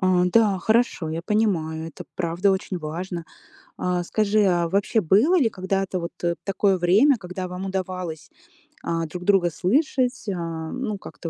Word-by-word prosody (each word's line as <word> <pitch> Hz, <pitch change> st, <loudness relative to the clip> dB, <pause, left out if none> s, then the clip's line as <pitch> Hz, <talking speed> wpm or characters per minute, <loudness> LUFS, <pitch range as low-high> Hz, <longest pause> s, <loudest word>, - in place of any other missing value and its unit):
А, 185 Hz, -1 st, +3 dB
да, 205 Hz, 0 st, +3 dB
хорошо, 220 Hz, -5 st, +1 dB
я 165 Hz, +1 st, -3 dB
понимаю, 170 Hz, -7 st, 0 dB
это 165 Hz, -, -10 dB
правда 175 Hz, +3 st, +1 dB
очень 190 Hz, 0 st, -2 dB
важно. 170 Hz, +2 st, -5 dB, 0.5 s
А 180 Hz, -1 st, -1 dB
скажи, 215 Hz, +2 st, +2 dB
а 175 Hz, -3 st, +2 dB
вообще 200 Hz, +4 st, +1 dB
было 220 Hz, -, +4 dB
ли 245 Hz, -8 st, +3 dB
когда-то 190 Hz, -1 st, -2 dB
вот 170 Hz, +1 st, -5 dB, 0.3 s
такое 195 Hz, -1 st, +1 dB
время, 215 Hz, +10 st, +4 dB
когда 185 Hz, 0 st, -6 dB
вам 180 Hz, +2 st, -6 dB
удавалось, 185 Hz, -5 st, -4 dB, 0.5 s
а, 165 Hz, -1 st, -1 dB
друг 180 Hz, +3 st, -7 dB
друга 190 Hz, -3 st, +3 dB
слышать, 255 Hz, -, 0 dB
а, 165 Hz, -3 st, -4 dB
ну, 240 Hz, -6 st, -3 dB
как-то 170 Hz, -, -8 dB
185 Hz, 155 wpm, -24 LUFS, 170-205 Hz, 0.5 s, было